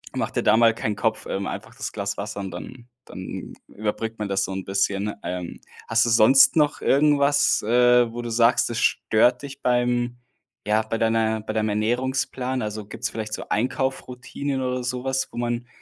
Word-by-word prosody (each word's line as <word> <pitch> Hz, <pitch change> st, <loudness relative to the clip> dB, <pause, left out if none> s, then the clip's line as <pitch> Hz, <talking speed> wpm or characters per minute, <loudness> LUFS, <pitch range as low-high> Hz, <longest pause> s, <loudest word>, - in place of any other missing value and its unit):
mach -, -, -2 dB
dir -, -, -1 dB
da -, -, +5 dB
mal 115 Hz, -1 st, +5 dB
keinen 105 Hz, -2 st, -2 dB
Kopf, -, -, -1 dB
ähm, 100 Hz, 0 st, -3 dB
einfach -, -, -7 dB
das -, -, -5 dB
Glas -, -, -3 dB
Wasser -, -, -5 dB
und 95 Hz, -1 st, -5 dB
dann 120 Hz, +8 st, -9 dB, 0.2 s
dann 95 Hz, 0 st, -7 dB, 0.2 s
überbrückt 110 Hz, +1 st, -4 dB
man 105 Hz, -, -2 dB
das 95 Hz, -, +1 dB
so -, -, -3 dB
'n 95 Hz, 0 st, -5 dB
bisschen. 100 Hz, +1 st, -1 dB
Ähm, 90 Hz, -1 st, -5 dB, 0.3 s
hast 115 Hz, +1 st, +3 dB
du -, -, 0 dB
sonst 120 Hz, +7 st, +6 dB
noch 150 Hz, -1 st, +2 dB
irgendwas, 145 Hz, 0 st, +3 dB
äh, 120 Hz, +1 st, +4 dB
wo 120 Hz, -, -4 dB
du 120 Hz, -, -5 dB
sagst, 115 Hz, +1 st, +3 dB
es 115 Hz, -, -3 dB
stört 120 Hz, +4 st, +2 dB
dich 140 Hz, 0 st, -9 dB
beim 120 Hz, 0 st, +1 dB, 0.5 s
ja, 105 Hz, +1 st, +3 dB
bei 115 Hz, +1 st, -3 dB
deiner 110 Hz, -1 st, +1 dB
bei 110 Hz, -, -5 dB
deinem 110 Hz, -1 st, 0 dB
Ernährungsplan? 125 Hz, +4 st, -1 dB
Also, 105 Hz, -1 st, -4 dB
gibt's 105 Hz, -, -4 dB
vielleicht 110 Hz, -1 st, -5 dB
so -, -, -5 dB
Einkaufsroutinen 130 Hz, +3 st, -2 dB
oder 125 Hz, -1 st, -2 dB
sowas, 125 Hz, +2 st, -2 dB
wo -, -, -11 dB
man 120 Hz, 0 st, -2 dB
120 Hz, 185 wpm, -24 LUFS, 110-125 Hz, 0.5 s, sonst